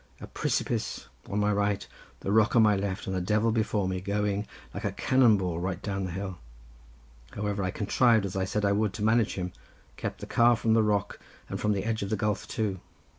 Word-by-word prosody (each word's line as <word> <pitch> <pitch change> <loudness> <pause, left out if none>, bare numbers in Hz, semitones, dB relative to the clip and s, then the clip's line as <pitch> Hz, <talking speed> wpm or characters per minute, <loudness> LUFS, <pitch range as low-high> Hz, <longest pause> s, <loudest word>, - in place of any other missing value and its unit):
A - - -7
pree - - -3
si - - +2
pice - - -3 0.2
on 100 - -2
my 105 0 +2
right, 100 0 0 0.3
the 100 - -2
rock 110 +2 +4
on 115 - +7
my 105 -1 +5
left, 100 -1 -3
and 95 - -3
a 90 - 0
devil 105 +5 +2
before 110 -3 0
me, 95 -1 -2
going, 100 +1 -1 0.3
like - - -6
a - - 0
cannon 125 -5 +4
ball, 90 -3 -2
right 90 0 -2
down 100 -2 -3
the 90 - -4
hill. 95 0 -5 1.0
However, 105 -1 -2
I 95 - 0
contrived, 110 +2 +3
as 95 - -5
I 95 -1 0
said 105 +2 -1
I 100 - +3
would, 105 -1 +1
to 105 - -4
manage 110 0 +3
him; 90 -1 -4 0.4
kept - - -4
the - - -6
car 120 0 +4
from 110 -1 +1
the 115 - +5
rock 105 -2 0 0.3
and - - -4
from 105 - +2
the 100 0 -2
edge 110 -1 -1
of 100 - -3
the 110 - 0
gulf 105 +2 -1
too. 105 -5 -2
105 Hz, 230 wpm, -28 LUFS, 95-110 Hz, 1.0 s, on